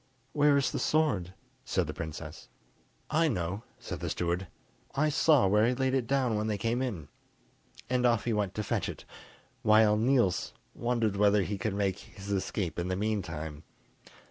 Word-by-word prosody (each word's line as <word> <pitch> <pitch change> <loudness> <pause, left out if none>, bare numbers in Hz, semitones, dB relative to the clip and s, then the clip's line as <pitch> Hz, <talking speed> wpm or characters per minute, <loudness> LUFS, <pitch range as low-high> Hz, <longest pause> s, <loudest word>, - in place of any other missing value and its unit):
"Where 145 -1 +4
is 140 - +1
the - - -2
sword?" 105 - +1 0.3
said - - 0
the - - -5
princess. 80 0 -7 0.6
"I 165 +2 +3
know," 95 - -2
said - - -6
the - - -3
steward, 90 +2 -1 0.5
"I 155 +3 +2
saw 150 -4 +4
where 105 +3 +4
he 125 - +1
laid 130 0 0
it 130 -3 0
down 130 -4 +1
when 105 +1 -1
they 105 -1 -1
came 115 +4 -1
in;" 100 - -3 0.8
and 125 0 +1
off 120 -2 +3
he 120 - +1
went 105 -3 -1
to 105 - -2
fetch - - -1
it, - - -8 0.6
while 110 0 +5
Niels 115 -5 +2 0.2
wondered 115 -4 0
whether 105 0 +4
he 100 +1 -3
could 110 -4 -2
make 100 -1 0
his 100 +1 -10
escape 95 -3 -2
in 85 - -2
the 95 - -1
meantime. 90 -8 -3
105 Hz, 175 wpm, -30 LUFS, 95-125 Hz, 0.8 s, while